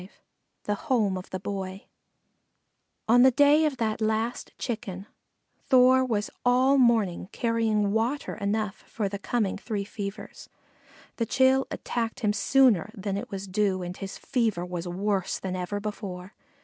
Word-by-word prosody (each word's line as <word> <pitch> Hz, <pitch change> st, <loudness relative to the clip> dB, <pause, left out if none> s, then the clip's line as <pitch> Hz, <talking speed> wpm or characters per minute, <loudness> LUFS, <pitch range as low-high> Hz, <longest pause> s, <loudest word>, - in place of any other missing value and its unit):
V 185 Hz, -, -12 dB, 0.5 s
THE 205 Hz, -, -1 dB
HOME 205 Hz, -2 st, 0 dB
OF 185 Hz, 0 st, -7 dB
THE 185 Hz, -, -4 dB
BOY 190 Hz, 0 st, -5 dB, 1.2 s
On 240 Hz, +2 st, +6 dB
the 260 Hz, -, +8 dB
day 290 Hz, +4 st, +5 dB
of 290 Hz, -4 st, -1 dB
that 220 Hz, -2 st, -1 dB
last 220 Hz, +2 st, -1 dB
Chicken, 210 Hz, -6 st, -5 dB, 0.6 s
Thor 260 Hz, 0 st, +6 dB
was 215 Hz, -5 st, -1 dB
all 255 Hz, +3 st, +4 dB
morning 220 Hz, -8 st, +2 dB
carrying 225 Hz, -3 st, +1 dB
water 240 Hz, +6 st, -1 dB
enough 210 Hz, 0 st, -2 dB
for 210 Hz, -3 st, -2 dB
the 200 Hz, 0 st, -5 dB
coming 205 Hz, -2 st, -1 dB
three 205 Hz, -3 st, -3 dB
fevers. 200 Hz, -1 st, -7 dB, 0.7 s
The 230 Hz, -, -1 dB
chill 265 Hz, +2 st, +3 dB
attacked 230 Hz, -1 st, -3 dB
him 210 Hz, -2 st, +2 dB
sooner 215 Hz, -2 st, +3 dB
than 195 Hz, 0 st, -3 dB
it 225 Hz, +6 st, -5 dB
was 195 Hz, 0 st, -6 dB
due 190 Hz, -1 st, 0 dB
and 175 Hz, +1 st, -5 dB
his 195 Hz, 0 st, -7 dB
fever 220 Hz, -8 st, -1 dB
was 180 Hz, -1 st, -5 dB
worse 190 Hz, +1 st, -1 dB
than 185 Hz, -1 st, -4 dB
ever 185 Hz, +3 st, -3 dB
before. 200 Hz, -3 st, -6 dB
210 Hz, 150 wpm, -27 LUFS, 195-240 Hz, 1.2 s, the